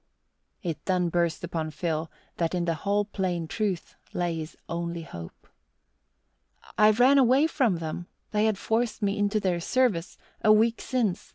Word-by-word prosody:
It 170 -4 -3
then 180 -2 +1
burst 170 -1 0
upon 160 -2 -3
Phil 160 +1 -2 0.3
that 165 +1 0
in 175 -1 0
the 170 - +1
whole 200 +6 0
plain 180 -5 -2
truth 195 -2 -2 0.2
lay 175 -2 -1
his 155 0 -7
only 170 0 -3
hope. 85 - -10 1.3
"I 215 0 +6
ran 250 +6 +5
away 265 +3 +5
from 265 - +2
them 165 +2 -5 0.2
they 210 0 +2
had 215 -2 +2
forced 225 +1 -1
me 200 0 +1
into 205 +1 +2
their 185 -4 0
service! 195 -3 0 0.3
a 215 - +6
week 225 +2 +4
since. 235 -8 -1
185 Hz, 160 wpm, -27 LUFS, 170-215 Hz, 1.3 s, I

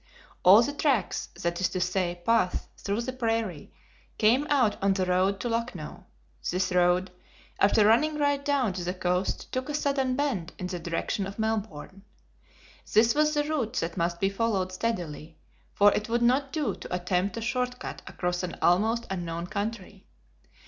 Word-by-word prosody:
All 200 +6 +8
the 285 - -2
TRACKS, 270 - 0 0.2
that 170 +1 -1
is 185 - +2
to 185 - -3
say, 180 -1 -1
paths 225 -6 +1
through 205 +3 -2
the 255 +2 -4
prairie, 225 - -2 0.5
came 245 +7 +3
out 250 -8 +2
on 195 0 +3
the 190 -1 0
road 185 +2 +1
to - - -2
Lucknow. 230 -9 -4 0.4
This 185 +1 0
road, 180 +1 +2 0.5
after 205 +1 +4
running 300 +8 +3
right 285 -1 +1
down 275 -8 +1
to 180 -1 -4
the 180 +2 -3
coast 180 +1 -1
took 255 +3 -3
a 295 - -2
sudden 275 -3 0
bend 235 - -2
in 185 - -5
the 180 -1 -4
direction 170 +3 -2
of 195 - -9
Melbourne. 210 -5 -3 0.9
This 225 +2 +5
was 305 +1 +2
the 295 - +2
route 295 -7 -2
that 165 +1 -2
must 170 0 -1
be 195 - +2
followed 195 -3 -1
steadily, 170 -7 -4 0.3
for 205 0 +5
it 210 +2 -2
would 235 +1 +1
not 265 +3 +2
do 285 -10 -1
to 180 - -6
attempt 180 +3 -1
a - - -3
short 250 +2 -1
cut - - -7
across 180 0 -2
an 180 -2 -5
almost 220 +6 +2
unknown 170 -2 -3
country. 200 0 -5
205 Hz, 175 wpm, -27 LUFS, 180-240 Hz, 0.9 s, All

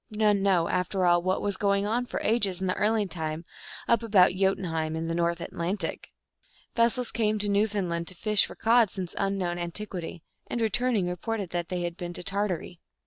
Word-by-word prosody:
None 210 -2 +2
know, 185 -4 +3
after 180 +1 0
all, 175 0 +4
what 185 +1 0
was 200 -2 0
going 200 0 +1
on 240 +4 0
for - - -3
ages 205 -5 +1
in 190 - -2
the 180 - +1
early 215 +1 +1
time, 160 -2 -4 0.4
up 235 - +3
about 200 -6 +5
Jotun 190 +1 +1
heim, 160 -2 -2
in 160 0 -3
the 165 - -1
North 170 0 0
Atlantic 175 +3 -3
I - - -34
Vessels 235 +1 +2
came 215 -2 +1
to 205 0 +1
New 205 +2 +3
foundland 175 -5 -2
to 185 - -5
fish 210 +3 +2
for - - -10
cod 230 -1 +4
since 185 -2 -5
unknown 195 -3 -1
antiquity, 175 -1 -5 0.2
and, 240 - -3
returning, 225 -2 +1
reported 190 +2 -3
that 175 -1 -3
they 180 -1 -2
had 175 0 -4
been 175 -1 -5
to 180 - -6
Tar 200 +3 0
tary. 180 -1 -5
190 Hz, 205 wpm, -27 LUFS, 175-210 Hz, 0.4 s, about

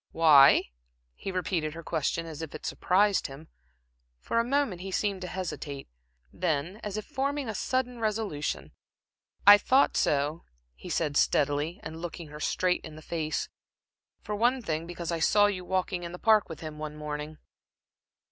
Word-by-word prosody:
"Why?" 150 -4 +7 0.5
He 195 - -6
repeated 170 -4 -2
her 165 - -8
question 165 +1 -1
as 160 -1 -7
if 160 - -6
it - - -8
surprised 200 +2 +2
him. 140 +3 -12 0.7
For 230 - 0
a - - +3
moment 245 -8 0
he 195 - -5
seemed 195 0 -1
to 180 - -4
hesitate; 165 -6 -5 0.5
then, 170 +2 -1
as 210 -2 -5
if 215 - -4
forming 280 0 -2
a 220 - -3
sudden 250 +3 -1
resolution: 215 -9 -2 0.7
"I 205 +1 +10
thought 265 +5 +3
so," 150 +3 +1 0.3
he - - -11
said, 150 -3 0
steadily, 150 +5 +1
and 160 +1 -7
looking 170 -2 -6
her 150 +1 -9
straight 180 +3 0
in 155 - -9
the 155 - -12
face 160 -1 -2 0.8
"for 210 - -3
one 245 +4 +2
thing, 160 -2 -2
because 175 -1 -5
I 165 - -1
saw 205 +5 +5
you 195 -3 -1
walking 185 -1 -1
in 170 0 -6
the - - -6
Park 215 0 +4
with 165 - -8
him 155 -1 -7
one 155 -1 -5
morning." 150 0 -5
175 Hz, 170 wpm, -28 LUFS, 155-205 Hz, 0.8 s, I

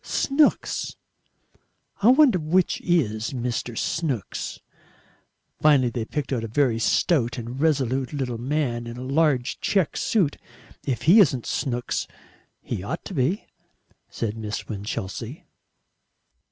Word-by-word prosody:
Snooks. 290 +2 +1 1.1
I 205 - +4
wonder 255 -6 +6
which 170 +4 +1
IS 120 -10 0
Mr. 120 -2 -3
Snooks." 145 - -2 1.0
Finally 140 -5 +5
they 115 -1 -3
picked 145 +2 -3
out 120 -3 -1
a - - -3
very 120 0 +1
stout 120 +1 +2
and 120 +3 -5
resolute 135 -4 +1
little 130 -6 -3
man 125 -3 -1
in 120 +1 -7
a 125 - -6
large 135 -2 +1
check 190 -6 +1
suit. 185 -10 +1 0.5
"If 130 -4 -1
he 180 +8 +7
isn't 135 - +4
Snooks, 125 -3 -2 0.6
he - - -4
ought 140 - -5
to - - -7
be," 155 +7 0 0.6
said 110 -2 -3
Miss 110 -2 -5
Winchelsea. 105 - -5
130 Hz, 125 wpm, -24 LUFS, 120-160 Hz, 1.1 s, he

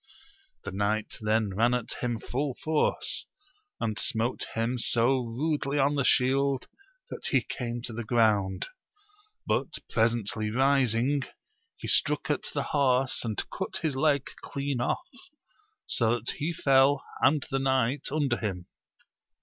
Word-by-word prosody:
The - - -5
knight 105 +2 -1
then 110 -1 +1
ran 120 +4 +3
at 125 -2 -3
him 120 -2 -1
full 135 +4 -2
force, 155 -1 0 0.5
and 110 -1 -2
smote 120 -1 0
him 115 +2 0
so 120 +3 +2
rudely 140 +4 -1
on 140 +1 +3
the 140 -1 +1
shield 135 +1 +2 0.4
that - - -4
he - - +3
came 120 -2 -4
to 120 - -5
the 120 +2 -4
ground; 105 -4 +2 0.8
but - - -1
presently 110 -2 +1
rising, 135 +1 +2 0.6
he - - -7
struck - - +2
at - - -1
the - - 0
horse 130 -2 +2
and 110 -4 -3
cut - - -3
his 155 -4 0
leg 140 -1 +2 0.2
clean 140 -3 -3
off, - - -1 0.8
so 115 -1 +2
that 115 - -3
he 155 +4 -1
fell 135 -2 +4 0.2
and 150 -1 +3
the 135 - +1
knight 130 0 +1
under 140 -5 +1
him. 95 -5 -4
125 Hz, 140 wpm, -28 LUFS, 115-140 Hz, 0.8 s, fell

